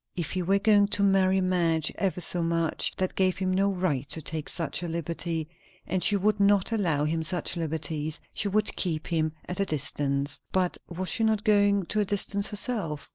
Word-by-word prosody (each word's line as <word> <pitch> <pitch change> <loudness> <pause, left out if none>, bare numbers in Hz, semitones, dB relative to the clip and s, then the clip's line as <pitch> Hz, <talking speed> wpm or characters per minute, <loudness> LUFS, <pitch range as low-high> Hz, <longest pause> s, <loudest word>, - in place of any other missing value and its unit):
If 170 -4 -3
he 185 - -1
were 195 +3 +2
going 205 0 +4
to 200 - +1
marry 190 -1 +3
Madge 170 -4 +1
ever 190 -2 -1
so 175 +1 0
much, 165 -1 0
that 185 0 -1
gave 185 -1 +1
him 185 -1 -1
no 195 +2 +2
right 175 -8 -1
to - - 0
take 155 0 -2
such 165 0 -2
a 175 - -4
liberty; 165 -1 -3 0.4
and 185 0 -2
she 205 - +4
would 205 +1 +1
not 200 0 +3
allow 165 -10 +1
him 160 +1 -1
such 175 +3 -2
liberties; 155 -2 -3
she 205 - -1
would 210 +2 +1
keep 160 -4 0
him 160 -2 -1
at 180 - -4
a 195 - +2
distance. 140 -2 -1
But 185 -1 0
was 185 +2 -4
she 225 - +1
not 220 -1 +1
going 205 -3 +3
to 215 - -1
a 210 - +2
distance 200 0 +2
herself? 205 - -2
180 Hz, 200 wpm, -27 LUFS, 160-200 Hz, 0.4 s, going